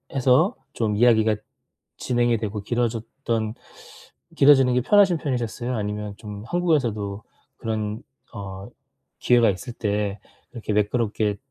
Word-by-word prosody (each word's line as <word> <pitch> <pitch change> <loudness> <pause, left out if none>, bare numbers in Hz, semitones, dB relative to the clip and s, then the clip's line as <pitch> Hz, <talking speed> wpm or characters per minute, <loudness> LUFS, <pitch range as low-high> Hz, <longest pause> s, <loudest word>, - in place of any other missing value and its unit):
해서 130 -1 +3 0.2
좀 110 -3 -1
이야기가 110 -1 +4 0.6
진행이 120 -1 +1
되고 105 -1 -4
길어졌던 115 0 -2 0.8
길어지는 135 -3 +6
게 125 - +3
편하신 195 - +4
편이셨어요? 125 -3 -3
아니면 105 0 -4
좀 105 -1 -8
한국에서도 115 - 0 0.3
그런 110 0 -3 0.3
어 100 -2 -7 0.5
기회가 120 -2 +4
있을 115 +6 -4
때 105 -2 -2 0.3
그렇게 115 -3 -5
매끄럽게 105 -1 0
115 Hz, 280 characters per minute, -24 LUFS, 105-125 Hz, 0.8 s, 길어지는